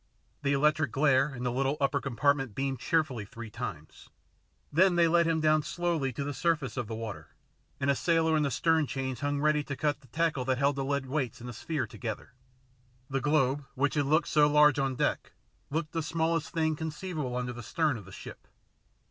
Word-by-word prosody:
The 140 Hz, 0 st, +1 dB
electric 150 Hz, +2 st, +2 dB
glare 140 Hz, 0 st, +3 dB
in 125 Hz, -, -6 dB
the 125 Hz, -, 0 dB
little 135 Hz, +3 st, 0 dB
upper 140 Hz, -1 st, +1 dB
compartment 135 Hz, -2 st, 0 dB
beamed 135 Hz, -2 st, -2 dB
cheerfully 150 Hz, -9 st, 0 dB
three 115 Hz, +2 st, -9 dB
times. 105 Hz, -10 st, -7 dB, 0.6 s
Then 180 Hz, +3 st, +5 dB
they 170 Hz, -1 st, +5 dB
let 170 Hz, 0 st, +3 dB
him 165 Hz, -1 st, +1 dB
down 155 Hz, 0 st, +3 dB
slowly 165 Hz, -4 st, -1 dB
to 140 Hz, -, -3 dB
the 145 Hz, +1 st, -3 dB
surface 150 Hz, -5 st, 0 dB
of 120 Hz, -4 st, -3 dB
the 110 Hz, -, -4 dB
water, 110 Hz, -2 st, -7 dB, 0.4 s
and 130 Hz, -, -1 dB
a 140 Hz, -, +4 dB
sailor 160 Hz, +1 st, +2 dB
in 155 Hz, -, +2 dB
the 145 Hz, -, +1 dB
stern 160 Hz, +1 st, +2 dB
chains 130 Hz, -2 st, -3 dB
hung 145 Hz, 0 st, -1 dB
ready 150 Hz, 0 st, +2 dB
to 140 Hz, -, -5 dB
cut 145 Hz, 0 st, -1 dB
the 130 Hz, -, -19 dB
tackle 155 Hz, 0 st, 0 dB
that 130 Hz, 0 st, +1 dB
held 140 Hz, +1 st, +1 dB
the 135 Hz, -, -1 dB
lead 140 Hz, 0 st, -1 dB
weights 130 Hz, -2 st, -2 dB
and 120 Hz, -, -8 dB
the 125 Hz, -, -6 dB
sphere 155 Hz, +5 st, -2 dB
together. 110 Hz, -1 st, -6 dB, 0.8 s
The 135 Hz, 0 st, 0 dB
globe, 145 Hz, -1 st, +2 dB
which 140 Hz, +2 st, +1 dB
had 145 Hz, -2 st, +1 dB
looked 155 Hz, +2 st, +2 dB
so 150 Hz, -1 st, +5 dB
large 150 Hz, -1 st, +5 dB
on 135 Hz, -1 st, 0 dB
deck, -, -, -1 dB, 0.4 s
looked 155 Hz, +1 st, -2 dB
the 165 Hz, -, -1 dB
smallest 165 Hz, +1 st, -1 dB
thing 160 Hz, -1 st, +1 dB
conceivable 155 Hz, -4 st, -4 dB
under 125 Hz, 0 st, -2 dB
the 120 Hz, -, -8 dB
stern 150 Hz, +6 st, 0 dB
of 105 Hz, -5 st, -9 dB
the 95 Hz, -, -13 dB
ship. -, -, -11 dB
145 Hz, 205 wpm, -29 LUFS, 130-155 Hz, 0.8 s, Then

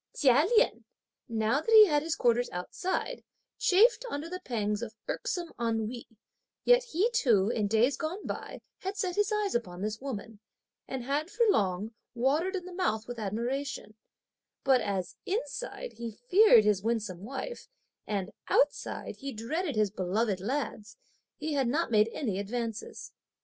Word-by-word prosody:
Chia 280 Hz, +3 st, +4 dB
Lien, 485 Hz, -, +3 dB, 0.5 s
now 225 Hz, +5 st, +1 dB
that 455 Hz, -, -6 dB
he 440 Hz, -1 st, +10 dB
had 295 Hz, -6 st, +2 dB
his 320 Hz, +1 st, -2 dB
quarters 240 Hz, 0 st, +2 dB
outside, 360 Hz, -, -3 dB, 0.4 s
chafed 460 Hz, +6 st, +5 dB
under 295 Hz, -2 st, -4 dB
the 365 Hz, +2 st, -5 dB
pangs 210 Hz, -, -2 dB
of 220 Hz, -2 st, -6 dB
irksome 345 Hz, -2 st, -3 dB
ennui, 230 Hz, +1 st, -2 dB, 0.6 s
yet -, -, +6 dB
he 450 Hz, +1 st, +1 dB
too, 225 Hz, -, +3 dB
in 215 Hz, -3 st, 0 dB
days 225 Hz, +6 st, +3 dB
gone 345 Hz, +6 st, -4 dB
by, -, -, -6 dB, 0.2 s
had 385 Hz, +2 st, -4 dB
set 365 Hz, -3 st, -1 dB
his 415 Hz, +1 st, +1 dB
eyes 420 Hz, -2 st, 0 dB
upon 185 Hz, -6 st, -3 dB
this 215 Hz, +2 st, -3 dB
woman, 225 Hz, -5 st, -6 dB, 0.5 s
and 265 Hz, -2 st, -4 dB
had 290 Hz, +6 st, -1 dB
for 465 Hz, +3 st, +2 dB
long, 200 Hz, -, 0 dB, 0.2 s
watered 300 Hz, +10 st, +1 dB
in 360 Hz, -2 st, -4 dB
the 365 Hz, -, -9 dB
mouth 225 Hz, -, -1 dB
with 245 Hz, -1 st, -6 dB
admiration; 235 Hz, +4 st, -3 dB, 0.7 s
but 265 Hz, -2 st, +4 dB
as, 195 Hz, -4 st, -3 dB
inside, -, -, -4 dB
he 235 Hz, -1 st, -5 dB
feared 245 Hz, -, +5 dB
his 210 Hz, -2 st, +2 dB
winsome 210 Hz, -5 st, -2 dB
wife, 270 Hz, -, -6 dB, 0.4 s
and 200 Hz, -1 st, -2 dB, 0.2 s
outside, 290 Hz, -, 0 dB
he 275 Hz, -1 st, -5 dB
dreaded 285 Hz, -, -3 dB
his 215 Hz, -2 st, +2 dB
beloved 195 Hz, +1 st, 0 dB
lads, 230 Hz, 0 st, -3 dB, 0.4 s
he 310 Hz, 0 st, -3 dB
had 270 Hz, -3 st, +1 dB
not 295 Hz, +3 st, 0 dB
made 215 Hz, 0 st, +4 dB
any 210 Hz, -9 st, -2 dB
advances. 225 Hz, +2 st, -4 dB
245 Hz, 155 wpm, -30 LUFS, 215-345 Hz, 0.7 s, he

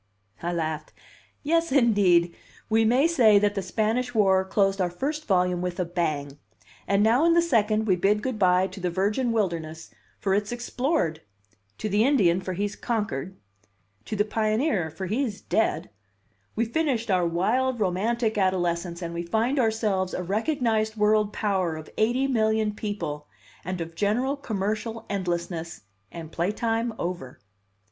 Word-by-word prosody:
I 175 Hz, -, -2 dB
laughed. 160 Hz, -3 st, -3 dB, 0.5 s
"Yes, 330 Hz, +1 st, +1 dB
indeed! 200 Hz, -10 st, +4 dB, 0.4 s
We 225 Hz, 0 st, +4 dB
may 250 Hz, +6 st, +4 dB
say 240 Hz, -11 st, +5 dB
that 205 Hz, 0 st, +2 dB
the 200 Hz, -, -2 dB
Spanish 225 Hz, +6 st, -1 dB
War 190 Hz, -3 st, +4 dB
closed 195 Hz, 0 st, +1 dB
our 180 Hz, -, +1 dB
first 295 Hz, -, -4 dB
volume 180 Hz, -2 st, +2 dB
with 180 Hz, 0 st, -3 dB
a 180 Hz, -, +1 dB
bang. 150 Hz, -5 st, -2 dB, 0.5 s
And 200 Hz, +1 st, +3 dB
now 235 Hz, +7 st, +4 dB
in 335 Hz, 0 st, +4 dB
the -, -, +6 dB
second 220 Hz, -8 st, +2 dB
we 190 Hz, -4 st, +3 dB
bid 205 Hz, +4 st, +1 dB
good 255 Hz, -4 st, -3 dB
by 180 Hz, -1 st, +4 dB
to 195 Hz, -, -8 dB
the 180 Hz, -1 st, -1 dB
virgin 205 Hz, +7 st, 0 dB
wilderness, 165 Hz, -7 st, -2 dB, 0.3 s
for 195 Hz, -, 0 dB
it's 205 Hz, +2 st, 0 dB
explored; 240 Hz, -, -1 dB, 0.6 s
to 215 Hz, -, -3 dB
the 210 Hz, +1 st, +2 dB
Indian, 195 Hz, -10 st, +3 dB
for 185 Hz, -, -4 dB
he's 205 Hz, +2 st, -2 dB
conquered; 190 Hz, -, -3 dB, 0.7 s
to 215 Hz, -, -4 dB
the 205 Hz, 0 st, +2 dB
pioneer, 215 Hz, -, 0 dB
for 190 Hz, +5 st, -6 dB
he's 220 Hz, +1 st, -2 dB
dead; 220 Hz, -, -1 dB, 0.6 s
we've 230 Hz, +1 st, -1 dB
finished 260 Hz, -9 st, 0 dB
our 180 Hz, -2 st, +2 dB
wild, 235 Hz, +9 st, 0 dB
romantic 215 Hz, +4 st, 0 dB
adolescence 175 Hz, -2 st, 0 dB
and 170 Hz, 0 st, -4 dB
we 170 Hz, -, -3 dB
find 225 Hz, +10 st, 0 dB
ourselves 215 Hz, -5 st, 0 dB
a 180 Hz, -, -3 dB
recognized 220 Hz, -, 0 dB
world 210 Hz, 0 st, +2 dB
power 190 Hz, -7 st, -1 dB
of 155 Hz, 0 st, -9 dB
eighty 240 Hz, +5 st, +2 dB
million 220 Hz, -4 st, +1 dB
people, 170 Hz, -9 st, -5 dB, 0.4 s
and 185 Hz, +1 st, -4 dB
of 165 Hz, 0 st, -5 dB
general 220 Hz, +10 st, 0 dB
commercial 220 Hz, -2 st, -3 dB
endlessness, 175 Hz, -3 st, -3 dB, 0.3 s
and 165 Hz, -2 st, -8 dB
playtime 225 Hz, +7 st, -1 dB
over." 170 Hz, -8 st, -5 dB
205 Hz, 155 wpm, -26 LUFS, 180-230 Hz, 0.7 s, the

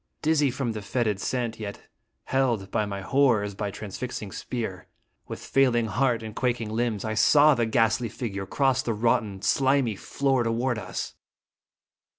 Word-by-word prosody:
Dizzy 150 Hz, -2 st, +3 dB
from 125 Hz, -1 st, -2 dB
the 110 Hz, -1 st, -5 dB
fetid 110 Hz, -2 st, -1 dB
scent, 120 Hz, -3 st, -2 dB
yet 100 Hz, -2 st, -6 dB, 0.4 s
held 120 Hz, -8 st, 0 dB
by 105 Hz, -, 0 dB
my 100 Hz, -1 st, -4 dB
horror 130 Hz, -1 st, +3 dB
as 105 Hz, 0 st, -4 dB
by 105 Hz, +1 st, -3 dB
transfixing 105 Hz, +1 st, -6 dB
spear, 100 Hz, -7 st, -5 dB, 0.4 s
with -, -, -6 dB
failing 125 Hz, -4 st, +3 dB
heart 115 Hz, +2 st, 0 dB
and 110 Hz, -1 st, -7 dB
quak 125 Hz, -1 st, 0 dB
ing 110 Hz, -2 st, -5 dB
limbs, 110 Hz, -3 st, -1 dB
I 110 Hz, -, -1 dB
saw 145 Hz, +7 st, +6 dB
the 120 Hz, -3 st, 0 dB
ghastly 115 Hz, +1 st, +2 dB
figure 100 Hz, -5 st, -5 dB
cross 135 Hz, +2 st, +2 dB
the 115 Hz, -, -2 dB
rotten, 110 Hz, -3 st, 0 dB
slimy 135 Hz, -4 st, +2 dB
floor 135 Hz, +5 st, 0 dB
toward 115 Hz, +1 st, 0 dB
us. -, -, -5 dB
115 Hz, 165 wpm, -26 LUFS, 105-130 Hz, 0.4 s, saw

